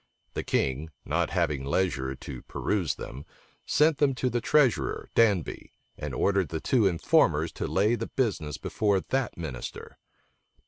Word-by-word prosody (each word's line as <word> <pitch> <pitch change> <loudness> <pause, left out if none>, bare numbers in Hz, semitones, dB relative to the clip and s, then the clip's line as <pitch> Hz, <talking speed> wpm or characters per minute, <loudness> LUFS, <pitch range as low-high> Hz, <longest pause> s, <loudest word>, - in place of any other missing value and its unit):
The - - -2
king, 70 +4 -1 0.2
not - - 0
having 70 -3 0
leisure 70 -3 0
to 65 -1 -8
peruse 85 -11 -1
them, 65 +4 -8 0.4
sent 150 -1 +3
them 140 -3 +3
to 125 0 -1
the 120 - 0
treasurer, 145 -2 +2
Danby, 105 -8 +1 0.2
and - - -5
ordered 100 -5 +2
the 80 - -3
two 115 +3 +3
informers 85 -3 +2
to - - -4
lay 105 +4 +2
the 120 - -2
business 85 - -1
before 100 -3 +1
that 135 +6 -2
minister. 75 -8 -7
95 Hz, 145 wpm, -28 LUFS, 75-120 Hz, 0.4 s, sent